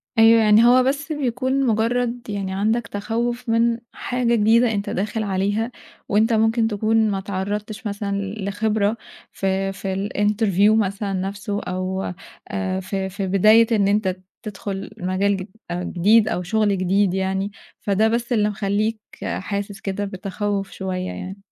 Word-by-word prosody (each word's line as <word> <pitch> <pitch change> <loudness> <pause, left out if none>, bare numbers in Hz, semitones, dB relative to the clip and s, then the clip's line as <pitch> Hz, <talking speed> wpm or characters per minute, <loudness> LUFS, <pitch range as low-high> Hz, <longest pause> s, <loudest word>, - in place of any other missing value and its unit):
أيوه، 225 0 +7
يعني 215 +1 +6
هو 250 +1 +6
بس 280 +4 -1
بيكون 265 -1 0
مجرّد 235 +2 0
يعني 195 -2 -3
عندك 215 +3 0
تخوّف 235 +4 -3
من 230 +1 +3 0.2
حاجة 245 -1 0
جديدة 225 +2 +4
أنت 200 -2 -2
داخل 215 +3 -2
عليها 205 +4 -1 0.4
وأنت 220 +3 +3
ممكن 225 +1 +3
تكُون 220 +1 +2
ما 195 - -1
إتعرّضتش 205 +3 -4
مثلًا 200 0 -3
ل 200 +1 -4
لخبرة 210 +1 0 0.3
في 195 0 -1
في 195 +1 -3
الInterview 205 0 +3
مثلًا 200 +1 -3
نَفْسه 195 +2 -3
أو 185 +1 -3 0.3
آآ 195 -2 -2
في 190 0 -3
في 195 0 -4
بداية 215 +4 +5
إن 200 -2 +3
أنت 200 -2 +1 0.3
تدخُل 200 -2 -5
مجال 185 +2 0
جد 185 0 -6 0.2
آآ 175 +1 -2
جديد 210 +6 +3
أو 180 - -1
شُغل 205 +1 +1
جديد 185 +1 +2
يعني، 190 +1 -1 0.3
فده 205 +2 +2
بس 235 +2 0
اللي 210 -2 +2
مخلّيك 210 +2 -1 0.2
حاسس 200 +1 -4
كده 200 +1 -2
بتتخوّف 195 +1 -3
شوية 185 -1 -4
يعني. 190 +2 -6
205 Hz, 150 wpm, -22 LUFS, 195-225 Hz, 0.4 s, أيوه